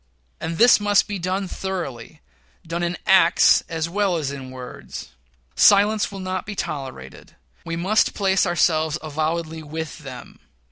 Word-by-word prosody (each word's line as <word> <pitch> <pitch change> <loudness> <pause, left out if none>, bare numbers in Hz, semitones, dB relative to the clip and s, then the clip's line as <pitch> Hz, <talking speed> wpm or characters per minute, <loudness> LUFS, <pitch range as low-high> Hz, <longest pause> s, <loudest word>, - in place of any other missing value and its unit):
And 165 +1 -4
this 240 +3 +6
must 205 -1 +3
be 205 -2 -4
done 185 +2 -2
thoroughly 160 -8 -6 0.4
done 170 +1 -3
in 175 0 -2
acts 190 -1 +5
as 165 -1 -2
well 190 0 0
as 145 -4 -2
in 135 -2 -8
words. 130 -1 -9 0.5
Silence 210 +1 +4
will 195 - -7
not 185 0 -3
be 210 -1 -7
tolerated 135 - -7 0.3
we 165 - -3
must 190 +6 +1
place 190 -2 +2
ourselves 160 -2 +1
avowedly 160 +1 -3
with 160 +2 -6
them. 130 -4 -10
170 Hz, 145 wpm, -22 LUFS, 155-190 Hz, 0.5 s, this